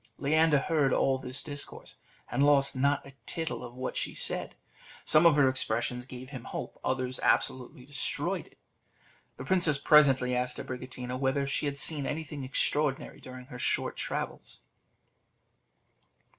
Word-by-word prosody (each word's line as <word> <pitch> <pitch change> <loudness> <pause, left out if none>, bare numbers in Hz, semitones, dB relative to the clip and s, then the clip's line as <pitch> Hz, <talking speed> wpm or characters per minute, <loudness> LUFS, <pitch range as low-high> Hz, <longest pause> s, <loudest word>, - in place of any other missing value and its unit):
Leander 155 +2 +3
heard 140 -1 +1
all 135 -1 +2
this 130 +1 -5
discourse, 145 -2 -5 0.3
and 140 - +2
lost 140 -2 +4
not 140 +2 +1
a 140 - -13
tittle 160 -5 -3
of 120 0 -9
what 130 0 -4
she - - -2
said; - - -1 0.5
some 155 +2 +6
of 165 - +5
her 145 -2 +5
expressions 125 -1 -1
gave 130 +1 -10
him 130 -5 -8
hope, - - -6
others 130 -1 -2
absolutely 125 +1 0
destroyed 145 +1 -1
it. - - -24 0.8
The - - -7
princess 175 -6 +3
presently 135 -3 +4
asked 125 0 -2
Abricotina 125 0 -6
whether 135 +1 0
she 140 +2 -1
had 140 0 -3
seen 145 -1 +3
anything 150 -2 -5
extraordinary 135 +1 -1
during 130 0 -10
her 125 -2 -10
short - - 0
travels? - - -4
135 Hz, 145 wpm, -29 LUFS, 130-145 Hz, 0.8 s, some